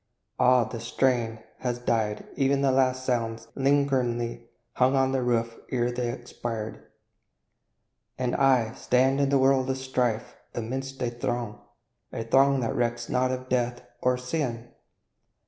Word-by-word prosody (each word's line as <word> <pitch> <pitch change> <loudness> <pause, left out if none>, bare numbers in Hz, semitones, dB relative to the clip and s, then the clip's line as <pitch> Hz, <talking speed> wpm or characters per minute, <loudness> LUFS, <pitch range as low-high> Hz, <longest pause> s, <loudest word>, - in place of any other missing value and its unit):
Ah, 125 -1 +5
the 115 +1 -6
strain 115 -2 0 0.2
Has 120 -1 -1
died 110 -3 -1
ev'n 135 0 +2
the 135 -1 +3
last 130 0 +2
sounds 115 -2 -1
that 115 +4 -9
lingeringly 130 -4 +1 0.3
Hung 130 +2 +3
on 135 0 +3
the 135 -1 +1
roof 115 -2 0
ere 125 -1 0
they 120 -1 -2
expired! 120 -2 -6 1.3
And 125 -1 -1
I, 125 -5 +3
Stand 130 +2 +2
in 140 - +2
the 140 - +4
world 135 0 +3
of 130 - 0
strife, 125 -3 -1 0.2
amidst 130 +3 -4
a 120 - 0
throng, 120 -2 -3 0.5
A 115 - -4
throng 135 +3 +4
that 115 - -1
recks 120 -1 -1
not 130 0 +2
or 130 - 0
of 130 0 -10
death, 125 -1 0 0.2
or 125 0 +2
sin! 125 -3 -3
125 Hz, 150 wpm, -27 LUFS, 120-130 Hz, 1.3 s, Ah